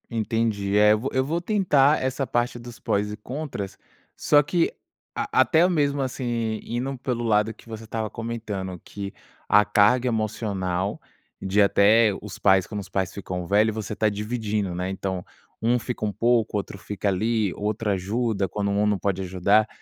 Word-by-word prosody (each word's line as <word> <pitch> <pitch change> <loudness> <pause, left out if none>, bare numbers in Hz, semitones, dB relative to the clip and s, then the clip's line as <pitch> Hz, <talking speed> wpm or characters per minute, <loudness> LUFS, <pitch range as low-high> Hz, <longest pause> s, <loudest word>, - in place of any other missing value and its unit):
Entendi. 110 -3 -1
Eh, 105 0 +6
eu 105 - +1
vou 130 +5 -3
eu 130 - +2
vou 165 +5 -1
tentar 160 -8 +3
essa 130 +1 -1
parte 120 0 0
dos 120 0 -11
prós 105 +1 0
e 105 - -6
contras, 125 -5 -6 0.4
só 145 - +4
que 170 +3 +1 0.4
a - - -2
até 165 +3 +4
mesmo, 145 -5 +1
assim, 120 -4 -2
indo 130 +3 -3
pelo 125 -2 -3
lado 105 0 +2
que 110 - -20
você 110 -1 -7
estava 110 0 -3
comentando 105 -6 -5
que 100 -1 -7 0.3
a 105 0 +5
carga 105 +5 +4
emocional 100 -4 -2 0.4
de 95 +2 +2
até 105 +2 +5
os 105 -2 -8
pais, 95 -2 +4
quando 105 - -5
os 95 - -10
pais 95 -2 -1
ficam 90 -3 -5
velho, 105 +4 +3
você 110 -1 -4
está 110 +1 +1
dividindo, 105 -2 -2
né? 90 +1 -3
Então 95 -1 -3 0.4
um 120 +2 +3
fica 120 -2 -4
um 105 - -1
pouco, 115 +1 +1
outro 100 0 -5
fica 100 0 -4
ali, 105 +1 0
outro 105 +1 -1
ajuda, 100 +1 -1
quando 100 +1 -1
um 105 +1 +2
não 105 -1 +2
pode 95 -1 -1
ajudar. 95 +4 +2
110 Hz, 175 wpm, -24 LUFS, 100-120 Hz, 0.4 s, Eh